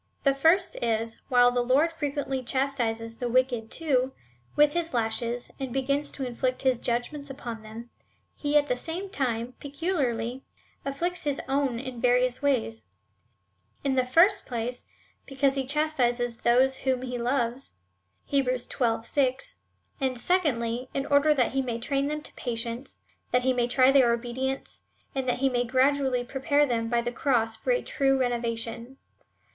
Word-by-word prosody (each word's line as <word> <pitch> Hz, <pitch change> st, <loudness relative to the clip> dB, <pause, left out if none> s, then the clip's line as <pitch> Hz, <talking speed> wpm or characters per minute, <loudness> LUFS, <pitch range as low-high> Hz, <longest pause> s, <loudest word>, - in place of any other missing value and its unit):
The 275 Hz, -, +4 dB
first 325 Hz, +7 st, +3 dB
is, 225 Hz, -1 st, 0 dB
that -, -, -30 dB
w^hile 245 Hz, -1 st, +5 dB
the 245 Hz, -, +2 dB
Lord 275 Hz, +7 st, +3 dB
frequently 285 Hz, -4 st, -2 dB
chas 270 Hz, +2 st, 0 dB
tises 230 Hz, -3 st, -3 dB
the 245 Hz, -2 st, -2 dB
wicked, 245 Hz, -2 st, +1 dB
too, 265 Hz, -5 st, 0 dB, 0.4 s
with 295 Hz, 0 st, +5 dB
his 335 Hz, -5 st, -1 dB
lashes, 235 Hz, +1 st, -1 dB
and 265 Hz, -2 st, -4 dB
begins 280 Hz, +3 st, 0 dB
to 270 Hz, -, -4 dB
inflict 255 Hz, +1 st, -2 dB
his 260 Hz, -3 st, +2 dB
judgments 250 Hz, +5 st, -2 dB
upon 240 Hz, -4 st, -6 dB
them, 225 Hz, +2 st, -10 dB, 0.4 s
he 290 Hz, 0 st, +1 dB
at 290 Hz, -, +4 dB
the 250 Hz, -3 st, 0 dB
same 345 Hz, +9 st, -4 dB
time 245 Hz, -, -2 dB
peculiarly 275 Hz, -6 st, -2 dB, 0.4 s
afflicts 335 Hz, +6 st, -2 dB
his 285 Hz, -2 st, 0 dB
own 270 Hz, -3 st, 0 dB
in 250 Hz, -1 st, -6 dB
various 250 Hz, 0 st, +2 dB
ways; 230 Hz, -, 0 dB, 0.5 s
— 100 Hz, +1 st, -43 dB
in 275 Hz, -, +1 dB
the 260 Hz, -1 st, +3 dB
first 335 Hz, +11 st, +4 dB
place, 245 Hz, 0 st, -4 dB, 0.4 s
because 270 Hz, 0 st, +1 dB
he 270 Hz, -1 st, -2 dB
chastises 250 Hz, -5 st, +1 dB
those 255 Hz, +3 st, +3 dB
whom 260 Hz, -1 st, -1 dB
he 250 Hz, -1 st, -4 dB
loves, 245 Hz, +1 st, -1 dB, 0.6 s
(Heb. 275 Hz, -2 st, +2 dB
xii. 235 Hz, -2 st, -1 dB
6 275 Hz, -, 0 dB, 0.2 s
;) -, -, -36 dB
and 260 Hz, -2 st, 0 dB
secondly, 250 Hz, -8 st, 0 dB
in 275 Hz, -, -1 dB
order 285 Hz, +1 st, +4 dB
that 250 Hz, -4 st, +2 dB
he 270 Hz, -, +1 dB
may 240 Hz, -3 st, -3 dB
train 275 Hz, +4 st, -1 dB
them 300 Hz, 0 st, -3 dB
to -, -, -10 dB
patience, 235 Hz, +1 st, -5 dB, 0.3 s
that 250 Hz, 0 st, +2 dB
he 260 Hz, 0 st, +3 dB
may 245 Hz, -1 st, +1 dB
try 255 Hz, +2 st, +5 dB
their 260 Hz, -4 st, +5 dB
obedience, 250 Hz, +3 st, -3 dB, 0.3 s
and 265 Hz, -2 st, -2 dB
tliat 250 Hz, -, +2 dB
he 270 Hz, +1 st, +1 dB
may 245 Hz, -1 st, +1 dB
gradually 260 Hz, 0 st, +2 dB
prepare 280 Hz, +3 st, +1 dB
them 230 Hz, -3 st, -1 dB
by 235 Hz, 0 st, +2 dB
the 240 Hz, +1 st, -3 dB
cross 230 Hz, -4 st, +1 dB
for 360 Hz, -, -6 dB
a -, -, +2 dB
true 270 Hz, -1 st, +1 dB
renovation. 235 Hz, 0 st, -2 dB
255 Hz, 170 wpm, -27 LUFS, 240-280 Hz, 0.6 s, w^hile